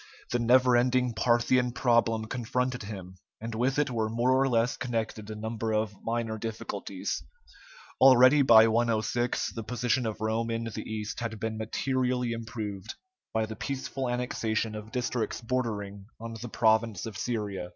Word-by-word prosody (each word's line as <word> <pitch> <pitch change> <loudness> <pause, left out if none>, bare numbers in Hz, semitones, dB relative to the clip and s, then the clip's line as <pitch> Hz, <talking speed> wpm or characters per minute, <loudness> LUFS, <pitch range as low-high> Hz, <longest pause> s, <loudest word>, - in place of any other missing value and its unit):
The 120 - +1
never 125 +1 +5
ending 125 0 +2
Parthian 120 +2 +2
problem 115 -3 +2
confronted 125 +2 -2
him, 95 -3 -8 0.2
and 115 +1 -5
with 125 +5 0
it 145 -3 +1
were 110 -2 -1
more 120 +3 +1
or 135 +1 +3
less 115 0 +2
connected 110 -5 -3
a 110 - -5
number 110 +1 -3
of 110 -1 0
minor 115 -1 -2
difficulties. 115 0 -4 0.8
Already 130 +2 +7
by 115 -4 +8
106 115 +1 0
the 115 - -5
position 120 +2 0
of 110 -1 -4
Rome 110 +1 -1
in 115 0 -2
the 115 -2 -6
East 110 -1 -4
had 115 -2 -4
been 110 0 -2
materially 125 +2 -1
improved 110 -4 -5 0.4
by 110 0 0
the 110 0 -7
peaceful 135 +1 -3
annexation 115 -3 -1
of 105 +1 -8
districts 125 -1 -2
bordering 105 -5 -3
on 115 0 -6
the 120 - -6
province 110 -3 +2
of 110 -3 -7
Syria. 100 -6 -3
115 Hz, 155 wpm, -28 LUFS, 110-125 Hz, 0.8 s, by